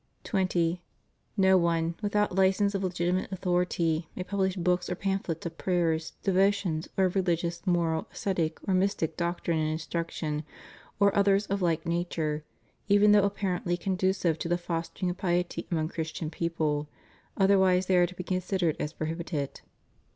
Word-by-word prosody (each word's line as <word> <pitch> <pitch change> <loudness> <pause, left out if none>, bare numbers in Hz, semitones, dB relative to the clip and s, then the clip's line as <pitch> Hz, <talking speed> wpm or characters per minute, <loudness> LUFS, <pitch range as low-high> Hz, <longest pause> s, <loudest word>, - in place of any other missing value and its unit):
20. 180 -3 0 0.6
No 190 -1 +5
one, 170 -1 +1
without 210 -1 +1
license 195 +2 +3
of 195 -1 -1
legitimate 180 +1 -1
authority, 175 -3 0
may 185 - -3
publish 190 -1 0
books 180 0 0
or 180 - -1
pamphlets 190 -4 -2
of 165 -1 -6
prayers, 165 -4 0
devotions, 190 -4 +2
or 190 - +4
of 180 - 0
religious, 175 -3 0
moral, 165 -3 +1
ascetic, 170 -5 -1
or 190 - +2
mystic 185 -4 +1
doctrine 170 -1 -1
and 155 0 0
instruc 165 +1 -3
tion, 150 -2 -3 0.6
or 200 -1 +4
others 200 0 +3
of 200 0 -2
like 165 -2 +1
nature, 165 -3 -1 0.4
even 205 0 +5
though 205 -1 +6
apparently 185 -3 -1
con 185 +2 -1
ducive 185 -3 +1
to 170 - -3
the 175 - +2
fostering 175 +1 -3
of 175 - -7
piety 175 -3 -1
among 160 -3 0
Christian 160 -1 -4
people; 155 -4 -1 0.5
otherwise 190 -2 +4
they 185 - +2
are 175 0 +5
to 185 - -11
be 180 - -5
considered 185 -2 0
as 150 - -3
prohibited. 160 -3 -4
175 Hz, 160 wpm, -28 LUFS, 165-190 Hz, 0.6 s, though